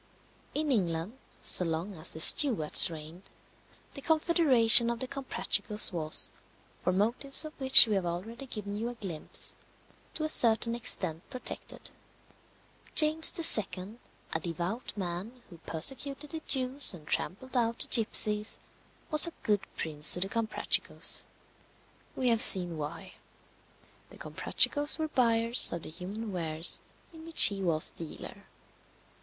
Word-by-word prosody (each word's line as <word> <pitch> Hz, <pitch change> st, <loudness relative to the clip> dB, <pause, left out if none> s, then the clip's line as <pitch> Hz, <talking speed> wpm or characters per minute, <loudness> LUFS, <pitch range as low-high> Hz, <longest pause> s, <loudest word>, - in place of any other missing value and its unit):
In 300 Hz, -1 st, -2 dB
England, 185 Hz, +1 st, -4 dB, 0.2 s
so -, -, +5 dB
long 165 Hz, +4 st, -5 dB
as 160 Hz, -2 st, -2 dB
the -, -, -8 dB
Stuarts 190 Hz, -, +5 dB
reigned, 165 Hz, +3 st, -11 dB, 0.6 s
the 275 Hz, -, -11 dB
confederation 280 Hz, -8 st, +3 dB
of 235 Hz, -1 st, -5 dB
the 260 Hz, -, -6 dB
Comprachicos 245 Hz, -6 st, -1 dB
was 155 Hz, -2 st, -1 dB, 0.5 s
(for 180 Hz, -, -3 dB
motives 235 Hz, +10 st, 0 dB
of 310 Hz, -, -10 dB
which 265 Hz, -1 st, +8 dB
we 220 Hz, -, -4 dB
have 190 Hz, -3 st, -3 dB
already 225 Hz, +10 st, -8 dB
given 205 Hz, -4 st, -8 dB
you 225 Hz, +3 st, -5 dB
a 245 Hz, -, -10 dB
glimpse) 185 Hz, -9 st, -6 dB, 0.6 s
to 310 Hz, -, -4 dB
a -, -, -2 dB
certain 230 Hz, -4 st, +1 dB
extent 170 Hz, -8 st, +1 dB
protected. 255 Hz, -2 st, -8 dB, 1.0 s
James 310 Hz, +1 st, +2 dB
II., 215 Hz, -, +2 dB, 0.3 s
a 160 Hz, -, -2 dB
devout 175 Hz, +8 st, -6 dB
man, 195 Hz, +7 st, -7 dB
who 170 Hz, -, -15 dB
persecuted 275 Hz, -, 0 dB
the 320 Hz, -, -8 dB
Jews 260 Hz, -4 st, +3 dB
and 155 Hz, -3 st, -16 dB
trampled 260 Hz, -, -5 dB
out 235 Hz, -1 st, -2 dB
the -, -, -1 dB
gipsies, 210 Hz, -1 st, 0 dB, 0.5 s
was 305 Hz, +2 st, +6 dB
a 340 Hz, -, -9 dB
good 205 Hz, -2 st, -1 dB, 0.2 s
prince 150 Hz, -1 st, +1 dB
to -, -, -6 dB
the 190 Hz, +2 st, -3 dB
Comprachicos. 230 Hz, +1 st, 0 dB, 0.9 s
We 255 Hz, -1 st, -2 dB
have 230 Hz, -1 st, +1 dB
seen 175 Hz, -3 st, +6 dB
why. 150 Hz, -1 st, -10 dB, 0.9 s
The -, -, -14 dB
Comprachicos 290 Hz, 0 st, 0 dB
were 315 Hz, -1 st, -5 dB
buyers 230 Hz, -2 st, +2 dB
of 170 Hz, -, -7 dB
the -, -, -9 dB
human 205 Hz, +6 st, -9 dB
wares 165 Hz, -2 st, +2 dB, 0.3 s
in 320 Hz, -1 st, -14 dB
which 330 Hz, 0 st, +3 dB
he 200 Hz, -1 st, +3 dB
was 165 Hz, -4 st, +3 dB
dealer. 165 Hz, -2 st, -11 dB
220 Hz, 140 wpm, -27 LUFS, 175-260 Hz, 1.0 s, which